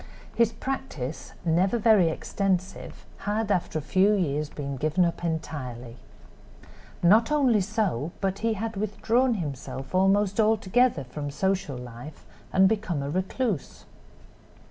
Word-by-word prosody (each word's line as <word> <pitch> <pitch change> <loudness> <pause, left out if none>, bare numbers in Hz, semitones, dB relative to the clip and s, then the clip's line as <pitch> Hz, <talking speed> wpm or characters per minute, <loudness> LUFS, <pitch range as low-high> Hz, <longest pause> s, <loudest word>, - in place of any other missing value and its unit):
His 230 -1 +3
practice, 230 - -5
never 180 +7 +2
very 215 -6 +5
extensive, 190 +2 -3
had 210 +1 -1
after 175 -4 0
a 155 - -3
few 190 +6 +3
years 150 -5 -1
been 140 -2 -5
given 155 +6 +1
up 170 0 -3
entirely. 130 -8 -4 1.1
Not 220 +9 +5
only 260 -8 +3
so, 185 - -1
but 195 0 -1
he 225 +1 +1
had 220 +2 -4
withdrawn 225 +5 +1
himself 135 -5 -6
almost 195 +2 +2
altogether 220 - +3
from 145 +3 -6
social 185 -3 -1
life 125 +4 -10 0.3
and 190 0 +5
become 190 -8 -1
a 140 - -3
recluse. 190 - -2
190 Hz, 125 wpm, -26 LUFS, 150-215 Hz, 1.1 s, very